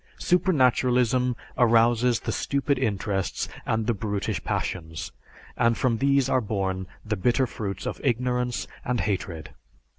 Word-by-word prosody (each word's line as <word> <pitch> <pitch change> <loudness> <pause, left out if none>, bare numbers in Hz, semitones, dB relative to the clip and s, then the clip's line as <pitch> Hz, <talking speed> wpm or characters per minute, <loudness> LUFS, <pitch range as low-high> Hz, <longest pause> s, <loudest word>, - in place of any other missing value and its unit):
Supernaturalism 125 - +2 0.2
arouses 120 0 +4
the - - -2
stupid 140 -1 0
interests 100 -5 -1 0.2
and 110 -1 0
the 120 - +2
brutish 105 -1 -3
passions, 80 -3 -3 0.4
and 115 -1 +2
from 120 -4 +1
these 140 -1 +3
are 130 -1 +2
born 95 -3 -2 0.2
the 110 0 -1
bitter 120 +6 +2
fruits 100 -5 -5
of - - -4
ignorance 125 -1 0 0.2
and 125 -1 0
hatred. 95 -6 -3
120 Hz, 125 wpm, -26 LUFS, 105-125 Hz, 0.4 s, arouses